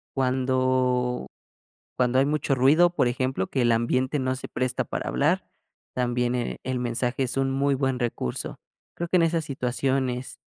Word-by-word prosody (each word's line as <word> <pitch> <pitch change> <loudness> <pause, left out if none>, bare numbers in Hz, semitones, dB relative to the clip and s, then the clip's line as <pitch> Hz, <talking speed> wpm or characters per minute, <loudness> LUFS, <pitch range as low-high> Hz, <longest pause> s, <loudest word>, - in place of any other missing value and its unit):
cuando 130 -1 +1 0.7
cuando 125 0 +2
hay 135 - +4
mucho 145 -1 0
ruido, 150 +7 +5
por 120 - +3
ejemplo, 130 -5 -1
que 130 - -1
el 120 -1 +4
ambiente 130 +5 +1
no 130 0 0
se - - -7
presta 130 -1 -1
para - - -4
hablar, - - +1 0.4
también, 125 -1 0
eh, 125 -1 -2
el 130 -1 -2
mensaje 125 +2 -1
es 125 - -1
un 135 0 +1
muy 140 +1 +1
buen 135 -1 0
recurso. 120 - -2 0.4
Creo 170 0 -4
que 185 - +4
en 170 - +4
esas 165 0 +1
situaciones 130 -1 -2
130 Hz, 165 wpm, -25 LUFS, 125-135 Hz, 0.7 s, ruido